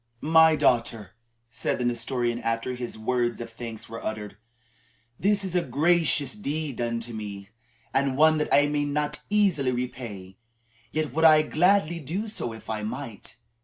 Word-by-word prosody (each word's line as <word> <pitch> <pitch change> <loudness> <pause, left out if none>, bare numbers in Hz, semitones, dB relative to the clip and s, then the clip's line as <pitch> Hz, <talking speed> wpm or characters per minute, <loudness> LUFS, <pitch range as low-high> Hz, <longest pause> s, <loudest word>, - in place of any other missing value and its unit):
"My 160 -1 +7
daughter," 115 -8 +1 0.4
said - - -2
the 125 - -2
Nestorian 120 0 -1
after 115 +2 -1
his 120 -2 -6
words 120 +1 0
of 115 -1 -7
thanks 115 -1 -8
were 115 0 -8
uttered; 105 -2 -5 0.8
"this 205 +1 +2
is 185 -2 -4
a 180 - +4
gracious 160 0 +2
deed 155 - -3
done 115 -1 -1
to 120 0 -6
me, 100 -2 -7 0.4
and 135 -1 +1
one 155 +1 +5
that 150 - -2
I 145 - +6
may 145 0 0
not 145 +1 -2
easily 195 -10 +2
repay. 115 -7 -5 0.5
Yet 155 -4 -2
would 160 +2 0
I 155 -1 +7
gladly 170 +1 +2
do 175 +9 -3
so, 165 - -4
if 110 -1 -11
I 110 -1 -3
might. 115 -1 -7
130 Hz, 165 wpm, -26 LUFS, 115-155 Hz, 0.8 s, My